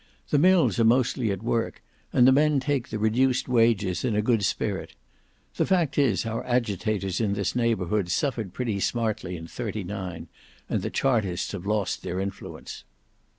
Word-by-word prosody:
"The 145 Hz, -, +4 dB
mills 180 Hz, -5 st, +4 dB
are -, -, +5 dB
mostly 120 Hz, 0 st, +2 dB
at 100 Hz, +1 st, -3 dB
work, 115 Hz, -1 st, -1 dB, 0.3 s
and 125 Hz, -, +5 dB
the -, -, +7 dB
men 150 Hz, +1 st, +4 dB
take 135 Hz, -2 st, -1 dB
the 110 Hz, -, -3 dB
reduced 125 Hz, +4 st, +2 dB
wages 115 Hz, -7 st, +2 dB
in 120 Hz, -5 st, 0 dB
a 105 Hz, -, +2 dB
good 115 Hz, -2 st, +2 dB
spirit. -, -, -2 dB, 0.6 s
The -, -, +2 dB
fact 175 Hz, -6 st, +2 dB
is 120 Hz, -9 st, +2 dB
our 115 Hz, 0 st, -3 dB
agitators 110 Hz, -5 st, -1 dB
in 105 Hz, -3 st, +1 dB
this 100 Hz, +1 st, -2 dB
neighbourhood 105 Hz, -5 st, 0 dB
suffered 115 Hz, 0 st, -1 dB
pretty 110 Hz, -1 st, -2 dB
smartly 105 Hz, -5 st, -1 dB
in 80 Hz, -, -8 dB
'39, 95 Hz, -4 st, -5 dB, 0.4 s
and -, -, -1 dB
the -, -, -3 dB
Chartists 110 Hz, -10 st, 0 dB
have 100 Hz, -1 st, -6 dB
lost 105 Hz, -3 st, 0 dB
their 90 Hz, -, -3 dB
influence. 95 Hz, 0 st, -6 dB
110 Hz, 165 wpm, -26 LUFS, 100-125 Hz, 0.6 s, the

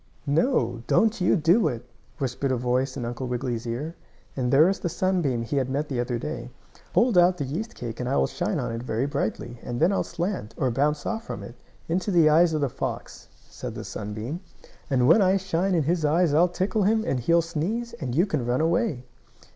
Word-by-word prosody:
"No, 140 Hz, -, +1 dB
don't 220 Hz, -2 st, +2 dB
you 180 Hz, -, +4 dB
do 175 Hz, +4 st, +4 dB
it!" 120 Hz, -4 st, -4 dB, 0.3 s
whispered 135 Hz, +1 st, -2 dB
a 130 Hz, -, +1 dB
voice 125 Hz, +2 st, 0 dB
in 120 Hz, -, -3 dB
Uncle 120 Hz, +2 st, -4 dB
Wiggily's 120 Hz, -1 st, -3 dB
ear, 140 Hz, +8 st, -3 dB, 0.4 s
and 125 Hz, -2 st, -1 dB
there 145 Hz, +4 st, +7 dB
was 195 Hz, +2 st, +1 dB
the 175 Hz, -, -2 dB
sunbeam 165 Hz, -10 st, 0 dB
he 140 Hz, +5 st, -2 dB
had 130 Hz, -1 st, 0 dB
met 145 Hz, +3 st, -2 dB
the 130 Hz, -3 st, -2 dB
other 120 Hz, 0 st, -1 dB
day. 125 Hz, -2 st, -5 dB, 0.5 s
"Hold 235 Hz, -6 st, +5 dB
out 180 Hz, +1 st, +4 dB
the 145 Hz, -, -2 dB
yeast 200 Hz, -, -4 dB
cake 115 Hz, -2 st, -6 dB
and 125 Hz, 0 st, -2 dB
I -, -, +1 dB
will 65 Hz, -, +3 dB
shine -, -, -2 dB
on -, -, -2 dB
it 115 Hz, 0 st, -4 dB
very 120 Hz, +1 st, -1 dB
brightly, 120 Hz, -4 st, -3 dB
and 120 Hz, -1 st, -4 dB
then 170 Hz, +4 st, +4 dB
I'll -, -, +1 dB
slant, 175 Hz, -, -4 dB
or 130 Hz, -, +1 dB
bounce 145 Hz, +4 st, 0 dB
off 225 Hz, 0 st, -3 dB
from -, -, -5 dB
it, 120 Hz, -, -9 dB, 0.3 s
into 180 Hz, +5 st, -1 dB
the 170 Hz, -5 st, +5 dB
eyes 165 Hz, +2 st, +5 dB
of 155 Hz, -, 0 dB
the 140 Hz, -, +2 dB
fox," 120 Hz, -, -5 dB, 0.2 s
said -, -, -7 dB
the -, -, -6 dB
sunbeam. 110 Hz, +9 st, -5 dB, 0.5 s
"And 125 Hz, -3 st, +3 dB
when 185 Hz, +8 st, +6 dB
I 190 Hz, 0 st, +4 dB
shine 185 Hz, 0 st, 0 dB
in 165 Hz, -, +2 dB
his 165 Hz, +2 st, 0 dB
eyes 155 Hz, +1 st, +3 dB
I'll 170 Hz, +4 st, +4 dB
tickle 195 Hz, +5 st, -1 dB
him, 220 Hz, +3 st, +2 dB
and 130 Hz, -, 0 dB
he'll 170 Hz, +7 st, +3 dB
sneeze, 185 Hz, +9 st, -3 dB
and 130 Hz, -6 st, -4 dB
you 175 Hz, +5 st, +4 dB
can 155 Hz, -10 st, -2 dB
run 120 Hz, +1 st, 0 dB
away." 160 Hz, -, 0 dB
150 Hz, 220 wpm, -25 LUFS, 125-180 Hz, 0.5 s, there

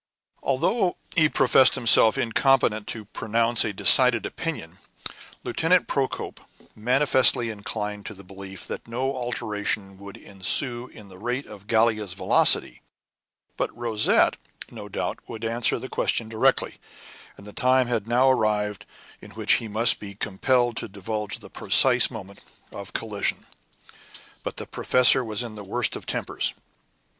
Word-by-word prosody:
Although 175 Hz, -, 0 dB, 0.2 s
he 155 Hz, -3 st, +4 dB
professed 130 Hz, -1 st, +4 dB
himself 115 Hz, -2 st, +5 dB
incompetent 115 Hz, -3 st, +1 dB
to 110 Hz, -2 st, -6 dB
pronounce 115 Hz, +3 st, +1 dB
a 110 Hz, -, -2 dB
decided 120 Hz, +4 st, +5 dB
opinion, 95 Hz, -, -6 dB, 0.6 s
Lieutenant 180 Hz, +3 st, +1 dB
Procope 135 Hz, -2 st, -3 dB, 0.4 s
manifestly 125 Hz, 0 st, +2 dB
inclined 105 Hz, 0 st, -5 dB
to 110 Hz, -, -8 dB
the 100 Hz, -, -12 dB
belief 95 Hz, -1 st, -9 dB
that -, -, -7 dB
no 130 Hz, +4 st, -3 dB
alteration 105 Hz, -5 st, -3 dB
would 100 Hz, 0 st, -11 dB
ensue 120 Hz, +6 st, 0 dB
in 105 Hz, -5 st, -15 dB
the 95 Hz, -1 st, -15 dB
rate 125 Hz, +5 st, -3 dB
of 100 Hz, -1 st, -13 dB
Gallia's 110 Hz, -4 st, +1 dB
velocity; -, -, +1 dB, 0.8 s
but -, -, -1 dB
Rosette, 115 Hz, -3 st, +2 dB, 0.3 s
no -, -, -10 dB
doubt, -, -, -4 dB
could 115 Hz, 0 st, -7 dB
answer 115 Hz, +1 st, +2 dB
the 130 Hz, -, -7 dB
question 115 Hz, -3 st, -1 dB
directly, 110 Hz, 0 st, 0 dB, 0.6 s
and 100 Hz, -, -14 dB
the 105 Hz, -, -11 dB
time 130 Hz, 0 st, +2 dB
had 115 Hz, -3 st, -3 dB
now 125 Hz, +3 st, +2 dB
arrived 105 Hz, -4 st, -1 dB, 0.3 s
in -, -, -12 dB
which -, -, +2 dB
he 115 Hz, -, -7 dB
must 110 Hz, +3 st, +3 dB
be 100 Hz, -1 st, -9 dB
compelled 120 Hz, +4 st, 0 dB
to -, -, -3 dB
divulge 105 Hz, +1 st, -4 dB
the -, -, -14 dB
precise 125 Hz, -2 st, +4 dB
moment 100 Hz, -4 st, -10 dB, 0.3 s
of 100 Hz, -1 st, -9 dB
collision. 105 Hz, -3 st, -2 dB, 1.0 s
But -, -, -7 dB
the -, -, -5 dB
professor 125 Hz, 0 st, +4 dB
was 110 Hz, 0 st, -1 dB
in 115 Hz, -2 st, -8 dB
the 105 Hz, -1 st, -9 dB
worst 115 Hz, +4 st, -1 dB
of -, -, -9 dB
tempers. -, -, -1 dB
115 Hz, 145 wpm, -24 LUFS, 105-125 Hz, 1.0 s, himself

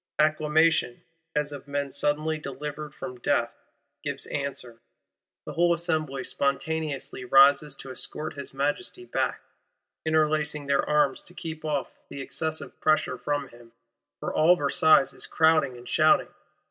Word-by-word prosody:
Acclamation, 155 Hz, -3 st, +2 dB, 0.3 s
as 150 Hz, -1 st, 0 dB
of 145 Hz, -1 st, -9 dB
men 140 Hz, -1 st, -2 dB
suddenly 150 Hz, +3 st, 0 dB
delivered 150 Hz, +1 st, -6 dB
from 125 Hz, -1 st, -7 dB
death, 120 Hz, -1 st, 0 dB, 0.5 s
gives -, -, -3 dB
answer. 130 Hz, -4 st, -4 dB, 0.7 s
The -, -, -6 dB
whole 175 Hz, 0 st, +3 dB
Assembly 155 Hz, -5 st, -2 dB
spontaneously 140 Hz, -1 st, -1 dB
rises 140 Hz, +3 st, +5 dB
to 135 Hz, -, -9 dB
escort 155 Hz, +4 st, -5 dB
his 140 Hz, -1 st, -8 dB
Majesty 145 Hz, -, -2 dB
back; -, -, -1 dB, 0.6 s
"interlacing 155 Hz, -1 st, +1 dB
their 140 Hz, 0 st, +2 dB
arms 150 Hz, -3 st, +2 dB
to 180 Hz, -, -8 dB
keep 160 Hz, -2 st, -6 dB
off 150 Hz, -3 st, -3 dB
the 140 Hz, -, -7 dB
excessive 160 Hz, +3 st, -4 dB
pressure 155 Hz, -5 st, +2 dB
from 145 Hz, -2 st, -2 dB
him;" 120 Hz, -1 st, -17 dB, 0.5 s
for -, -, -4 dB
all 165 Hz, +3 st, +5 dB
Versailles 155 Hz, 0 st, +5 dB
is -, -, -7 dB
crowding 155 Hz, -5 st, +3 dB
and 120 Hz, 0 st, -12 dB
shouting. 155 Hz, +4 st, +3 dB
150 Hz, 135 wpm, -27 LUFS, 135-155 Hz, 0.7 s, rises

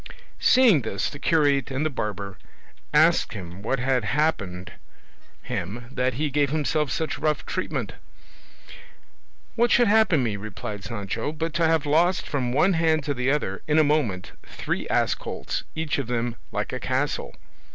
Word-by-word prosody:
Seeing 240 Hz, -, +5 dB
this, 105 Hz, -4 st, -2 dB
the 145 Hz, -, -9 dB
curate 145 Hz, -5 st, +2 dB
and 135 Hz, +3 st, -1 dB
the 155 Hz, -, 0 dB
barber 100 Hz, -5 st, -4 dB, 0.5 s
asked -, -, +4 dB
him 90 Hz, -2 st, -8 dB
what 125 Hz, +6 st, -1 dB
had 130 Hz, -1 st, +1 dB
happened 105 Hz, -, -1 dB, 0.7 s
him 110 Hz, +7 st, -4 dB
that 130 Hz, -1 st, 0 dB
he 150 Hz, +2 st, -1 dB
gave 145 Hz, 0 st, +2 dB
himself 150 Hz, 0 st, 0 dB
such 160 Hz, -1 st, -2 dB
rough 155 Hz, -1 st, 0 dB
treatment. -, -, -3 dB, 1.6 s
"What 240 Hz, +1 st, +3 dB
should 240 Hz, 0 st, +5 dB
happen 205 Hz, -9 st, +4 dB
me?" 110 Hz, -4 st, -1 dB
replied 105 Hz, 0 st, -6 dB
Sancho, 100 Hz, +6 st, -3 dB
"but 160 Hz, +1 st, -3 dB
to 170 Hz, -1 st, +2 dB
have 160 Hz, -2 st, +2 dB
lost 170 Hz, +5 st, +2 dB
from 130 Hz, -4 st, -1 dB
one 175 Hz, +9 st, +3 dB
hand 160 Hz, -2 st, +2 dB
to 145 Hz, 0 st, -1 dB
the 125 Hz, 0 st, -1 dB
other, 135 Hz, -10 st, -1 dB
in 150 Hz, 0 st, +2 dB
a 155 Hz, -, +6 dB
moment, 140 Hz, -12 st, 0 dB
three -, -, -4 dB
ass -, -, +2 dB
colts, -, -, -5 dB
each 160 Hz, -2 st, -1 dB
of 135 Hz, -, -3 dB
them 120 Hz, -1 st, -1 dB, 0.2 s
like -, -, -3 dB
a -, -, -3 dB
castle?" -, -, -2 dB
140 Hz, 160 wpm, -25 LUFS, 115-155 Hz, 1.6 s, a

